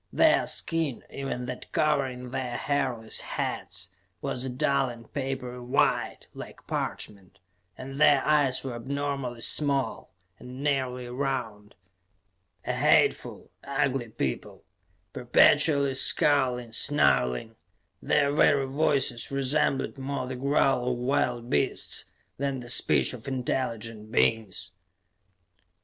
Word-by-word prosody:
Their - - +4
skin, 160 -6 -1
even 135 -2 -4
that 125 0 -7
covering 135 -5 0
their 130 -2 -3
hairless 130 -6 -2
heads, 85 +2 -5 0.3
was 125 - -4
a 130 - -3
dull 135 +1 +1
and 115 -1 -12
papery 130 -3 -4
white, 125 +3 0
like - - -10
parchment, 100 -2 -5 0.4
and 135 +2 -7
their 145 -3 +5
eyes 145 -4 +2
were 130 -2 -4
abnormally 135 -1 -4
small, 140 +1 0 0.3
and 130 +2 -9
nearly 130 -3 -1
round. 120 -5 -4 0.9
A - - -1
hateful, - - +2
ugly 135 -3 -1
people, 70 - -4 0.5
perpetually 140 +3 +4
scowling, 130 -3 +2
snarling; 60 - +2 0.5
their 140 - +2
very 145 -2 +3
voices 135 -4 0
resembled 135 0 0
more 135 -1 -3
the 130 0 -5
growl 135 -1 +1
of - - -4
wild 125 -2 0
beasts 70 - -1 0.3
than 140 -1 -2
the 120 0 -1
speech - - +4
of 125 -1 -10
intelligent 115 -4 -3
beings. 105 -5 0
130 Hz, 110 wpm, -27 LUFS, 120-140 Hz, 0.9 s, their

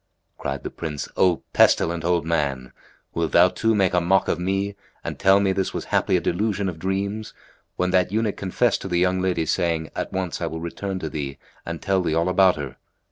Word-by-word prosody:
Cried 70 0 -4
the - - -5
Prince, 75 -3 -5
"O 90 -3 +2
pestilent 85 0 +3
old 85 -2 +1
man! 70 -6 -1 0.4
wilt 85 -1 -1
thou 90 - +7
too 115 +3 +1
make 95 -3 +2
a 90 - +3
mock 95 +3 +2
of - - 0
me 95 +2 -1 0.3
and - - -5
tell 95 +1 +5
me 100 -1 +2
this 95 0 -1
was - - -3
haply - - +3
a - - +1
delusion 100 +2 -1
of 85 -3 -5
dreams, 100 +4 -3 0.4
when 90 0 0
that 90 0 +2
eunuch 110 -1 0
confessed 100 +4 0
to - - -5
the 90 -2 0
young 90 +1 +2
lady, 90 -3 0
saying, 80 -1 0
'At - - -3
once 95 -2 -3
I - - 0
will 80 - -5
return 95 +3 -4
to 80 - -3
thee 70 -2 -4 0.3
and 85 -1 -4
tell 95 -1 +2
thee 80 -3 0
all 85 +2 +2
about 95 0 +5
her?'" 70 -4 -6
90 Hz, 215 wpm, -23 LUFS, 80-95 Hz, 0.4 s, thou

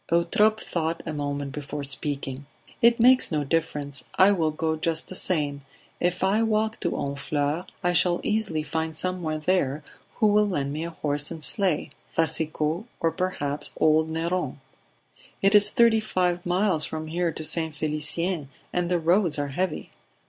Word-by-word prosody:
Eutrope 210 +6 +3
thought 165 -3 -3
a 155 - -4
moment 145 -1 -3
before 145 0 -6
speaking. 140 -1 -3 0.3
"It 235 0 +5
makes 255 -1 +5
no 150 -2 0
difference. 145 -2 -2
I 190 +2 +6
will 165 -6 +1
go 160 +1 -1
just 160 0 -2
the 185 - -7
same. 145 -7 -1 0.4
If 180 +1 0
I 200 +3 +3
walk 220 0 0
to 170 - -1
Honfleur, 145 +3 -2 0.2
I 175 0 +2
shall 175 0 +2
easily 210 -8 -1
find 160 +1 -3
someone 165 -4 -3
there 155 -6 +1 0.3
who 220 - +1
will 210 0 +4
lend 140 -7 -2
me 155 +2 -3
a - - -4
horse 145 -3 -1
and 160 -2 -8
sleigh 185 -5 +1 0.3
Racicot, 160 +2 0
or 165 - +1
perhaps 150 -6 -2
old 155 0 +3
Neron." 165 -2 -2 0.9
"It 195 +1 +4
is 205 0 +9
thirty 230 -2 +4
five 180 -4 -1
miles 180 -3 +1
from 155 +1 -3
here 170 +2 -1
to 155 - -5
St. 160 0 +3
Felicien 155 +1 -1 0.2
and 175 -1 0
the 180 - +2
roads 170 0 +2
are 145 -1 -2
heavy." 170 +3 -3
165 Hz, 165 wpm, -25 LUFS, 150-185 Hz, 0.9 s, is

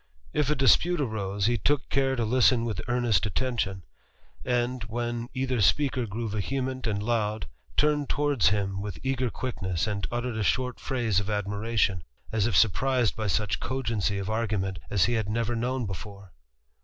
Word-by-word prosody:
If 150 -2 +1
a 150 - +3
dispute 150 - +4
arose, 100 -6 -1
he 120 0 +2
took 145 +5 +1
care 135 -1 +2
to 120 -3 0
listen 120 0 +4
with 110 -6 -3
earnest 120 -6 +2
attention; 100 -3 -1 0.6
and, 125 0 0
when 120 +1 -3
either 130 -3 0
speaker 125 - +2
grew 115 +3 -3
vehement 130 +5 -2
a^d 105 -2 -1
loud, 110 -3 0 0.3
turned 150 -1 +2
towards 145 -9 +3
him 100 -1 -1
with 100 -4 -5
eager 130 -2 0
quickness, 95 -8 -2
and 100 -5 -2
uttered 120 -1 -2
a 110 - 0
short 125 +3 0
phrase 120 -7 0
of 100 +1 -4
admiration, 105 -2 0 0.3
as 110 -1 +2
if 105 -7 +2
surprised 120 +3 +3
by 110 -1 -2
such 105 +1 0
cogency 115 -6 -1
of 100 -1 -3
argument 105 -4 -1
as 100 -5 +3
he 120 - 0
had 110 -3 -1
never 115 +2 0
known 125 +1 -1
before. 100 0 -8
115 Hz, 170 wpm, -27 LUFS, 100-125 Hz, 0.6 s, dispute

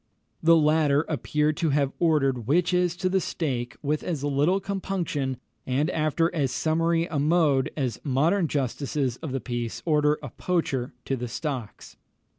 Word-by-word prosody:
The 165 +1 +6
latter 150 -2 +3
appear 150 +1 0
to 160 +1 0
have 140 -1 +1
ordered 135 -8 +2
witches 175 +3 +2
to 185 - -1
the 190 +1 +1
stake 125 -10 -3
with 150 +1 0
as 155 -6 -3
little 145 +7 +2
compunction, 180 -9 -2 0.3
and 140 +6 +1
after 160 +2 +1
as 140 -6 0
summary 165 +1 +1
a 155 -4 -3
mode, 150 -3 +3
as 125 -6 -2
modern 160 +7 +2
justices 135 -2 -1
of 160 -4 -6
the 135 - -1
peace 120 -1 -4
order 150 -2 +3
a 135 - -5
poacher 135 -8 -2
to 135 - 0
the 125 -1 -4
stocks. 130 -4 -5
150 Hz, 155 wpm, -26 LUFS, 135-165 Hz, 0.3 s, The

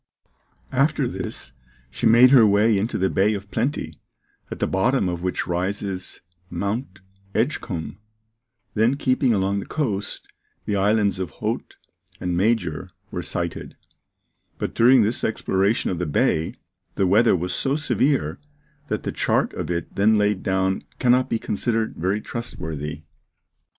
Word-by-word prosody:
After 140 +1 +2
this, 95 - -4 0.4
she 120 - 0
made 120 +3 +7
her 130 -4 +8
way 105 +1 +4
into 105 +4 -1
the 95 - +2
Bay 100 +3 +2
of 100 0 -8
Plenty, 110 - -2 0.5
at - - -5
the - - 0
bottom 105 +3 +1
of 85 -1 -3
which 90 0 -1
rises 95 +2 -3 0.3
Mount 100 +2 -3 0.3
Edgecumbe; 105 - -2 0.8
then 115 +5 +3
keeping 130 -2 +2
along 100 -1 +1
the - - -7
coast, 110 -10 -2 0.4
the 105 - -1
islands 100 -1 +2
of 95 -3 -2
Haute - - -4 0.4
and 90 -1 -2
Major 90 -4 0 0.2
were - - -3
sighted; - - -4 0.8
but - - -3
during 125 +1 +6
this 110 +4 -1
exploration 100 -1 +1
of 90 - -3
the 90 - -1
bay, 80 +2 +1 0.4
the 95 - +2
weather 105 +4 +4
was 90 +1 -2
so 135 +1 0
severe 145 -2 +1 0.5
that 105 - -2
the - - -2
chart - - +1
of - - -4
it 85 -1 -3
then 105 +2 +4
laid 105 -2 +1
down 95 0 0 0.2
cannot 125 0 +3
be 115 - +1
considered 110 +1 -1
very 95 +5 -1
trustworthy. 80 -10 -6
100 Hz, 145 wpm, -23 LUFS, 95-115 Hz, 0.8 s, her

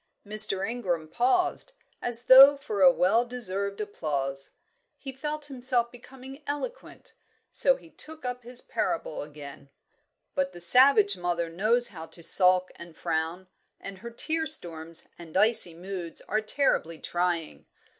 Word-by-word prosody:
Mr. 205 -2 +1
Ingram 185 -9 -3
paused, 360 - 0 0.3
as 240 0 -1
though 275 +2 +9
for 200 -10 +3
well 200 +7 +2
deserved 200 -5 -3
applause. 140 -9 -4 0.5
He 270 - -8
felt 300 +3 -6
himself 250 -3 0
becoming 265 +3 -13
eloquent, 385 +13 -7 0.4
so - - +2
he 330 -10 -17
took 315 -3 -7
up 250 0 -4
his 245 +1 -9
parable 330 - -3
again. 145 -1 -11 0.6
"But 275 0 -2
the - - -11
savage 210 +2 +5
mother 175 -1 -2
knows 220 +8 +1
how 165 -4 -10
to 165 +1 -15
sulk 185 +1 +5
and 170 -2 -13
frown, 165 +4 -3 0.3
and 195 -1 -9
her 235 - -8
tear 315 +7 0
storms 165 - +1
and 170 0 -6
icy 210 -5 +4
moods 180 -1 -6
are 215 +2 -2
terribly 215 - 0
trying. 175 -1 -3
210 Hz, 135 wpm, -27 LUFS, 170-255 Hz, 0.6 s, though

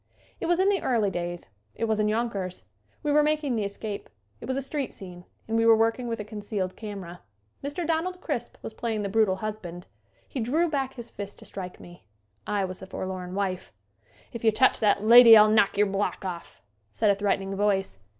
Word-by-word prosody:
It - - -3
was 350 +1 +2
in 385 +1 +4
the 390 -4 +1
early 220 -6 +1
days. 175 -1 -4 0.3
It - - -4
was 220 -1 0
in 210 - +2
Yonkers. 210 -5 -2 0.4
We 295 - 0
were 300 +1 +5
making 300 -3 0
"The 215 -2 -1
Escape." 200 +1 -6 0.3
It - - -8
was 260 +1 -1
a - - 0
street 275 0 -3
scene 180 -2 -11 0.2
and 225 - -2
we 225 - +3
were 225 - +8
working 225 +2 +1
with 230 -1 -3
a - - -3
con 215 0 -8
cealed 200 -3 -3
camera. 195 -5 -8 0.4
Mr. 290 +5 -3
Donald 335 +3 -1
Crisp - - -4
was - - -6
playing 225 -3 -2
the 200 - -2
brutal 210 -2 +3
husband. 190 -4 -6 0.4
He 270 - -5
drew 295 +10 +1
back 270 -3 -2
his 240 -2 -9
fist 200 0 -7
to - - -13
strike 185 -2 -7
me. 175 0 -14 0.4
I 205 -2 0
was 185 0 -7
the 190 - -10
forlorn 185 -1 -5
wife. 190 -2 -3 0.6
"If 235 - -7
yu' 220 - +5
touch 260 +5 +3
that 205 -1 +2
lady 230 0 +10
I'll 215 0 +7
knock 205 -2 +3
yer 210 - +5
block 195 0 -2
off," 170 - -7 0.3
said 210 - +2
a - - +2
threatening 195 -1 -1
voice. 195 - 0
210 Hz, 210 wpm, -26 LUFS, 195-240 Hz, 0.6 s, lady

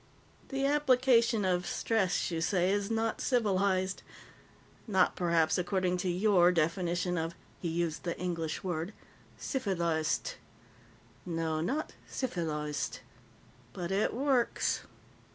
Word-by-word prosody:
"The 270 0 -1
application 255 -6 +3
of 180 -1 +1
stress, 195 -6 0
you 165 -1 -2
say, 180 +1 +2
is 200 0 0
not 225 0 -1
civilized. 195 -6 +1 0.9
Not, 190 -4 +3
perhaps, 170 -1 +2
according 180 0 0
to 180 0 -1
your 180 -1 +4
definition 175 +1 0
of" 165 +1 -3 0.2
he 175 - -3
used 165 -1 -1
the 170 - -3
English 165 -3 -3
word 175 +1 -3 0.4
"_cifiliced__. 170 - -1 0.9
No. 165 -2 -1
Not 275 - -2 0.2
cifiliced 155 - -3 0.7
but 175 0 -4
it 200 +2 +2
works." 260 -2 +1
180 Hz, 110 wpm, -31 LUFS, 170-220 Hz, 0.9 s, your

